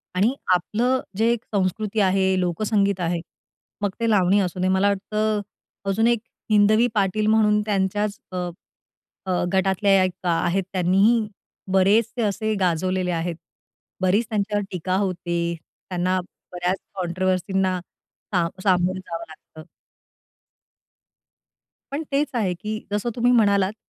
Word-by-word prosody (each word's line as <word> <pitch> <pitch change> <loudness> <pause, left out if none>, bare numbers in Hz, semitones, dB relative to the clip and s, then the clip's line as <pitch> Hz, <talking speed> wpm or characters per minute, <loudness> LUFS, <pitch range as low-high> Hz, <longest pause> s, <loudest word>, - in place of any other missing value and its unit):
आणि 205 +7 +3 0.2
आपलं 235 +8 +1 0.2
जे 230 +2 +3 0.2
संस्कृती 200 +3 0
आहे, 190 -1 +2
लोकसंगीत 200 +2 +1
आहे, 170 -1 -1 0.6
मग 205 - +1
ते 230 0 +1
लावणी 200 -1 +4
असू 180 -1 -3
दे. 185 - +1
मला 190 +2 +3
वाटतं 210 +2 -1 0.5
अजून 220 +4 +2
एक 235 -1 +3 0.3
हिंदवी 215 +3 +5
पाटील 210 +1 +1
म्हणून 215 -1 +4
त्यांच्याच 205 0 0
अ, 185 - -4 0.9
अ, 185 -2 0
गटातल्या 195 0 +3
एक 185 0 -4
आहेत, 175 +3 +1
त्यांनीही 195 +5 +3 0.5
बरेचसे 210 +5 +3
असे 215 +1 0
गाजवलेले 185 +1 0
आहेत. 170 0 -2 0.7
बरीच 190 +5 +2
त्यांच्यावर 205 -1 0
टीका 185 +1 -2
होते, 175 -3 -1 0.3
त्यांना 185 +1 0 0.3
बऱ्याच 180 +1 -1 0.2
कॉन्ट्रोव्हर्सींना 185 +1 0 0.5
सा 175 -4 +2 0.2
सामोरं 185 -1 +2
जावं 170 -2 -6
लागतं. 155 0 -14 2.3
पण 290 +3 -2
तेच 285 +2 +2
आहे, 210 -7 0
की 215 +4 -5
जसं 205 +3 -1
तुम्ही 245 +1 +3
म्हणालात, 200 -4 +3
195 Hz, 120 wpm, -23 LUFS, 185-215 Hz, 2.3 s, हिंदवी